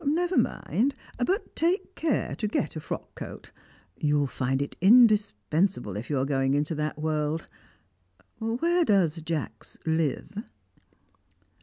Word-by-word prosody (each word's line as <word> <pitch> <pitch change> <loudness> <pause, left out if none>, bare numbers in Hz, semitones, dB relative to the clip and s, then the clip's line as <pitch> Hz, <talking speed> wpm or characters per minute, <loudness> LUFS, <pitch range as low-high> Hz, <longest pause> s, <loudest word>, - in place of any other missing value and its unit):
Never 345 +5 +1
mind, 270 +5 +1 0.3
but 385 - -1
take 345 +5 0
care 315 -6 0
to 215 - -1
get 185 -7 -1
a - - -3
frock - - -6
coat; - - -9 0.5
you'll 145 -1 +2
find 130 0 -1
it 140 - -3
indispensable 195 - +4
if 105 +3 -6
you 145 - 0
are 130 - +1
going 135 -1 +1
into 150 +2 0
that 150 -1 -2
world. 155 0 -1 0.9
Where 330 +11 +1
does 180 - +2
Jacks 150 -9 -5
live?" 160 - -1
160 Hz, 130 wpm, -27 LUFS, 145-230 Hz, 0.9 s, indispensable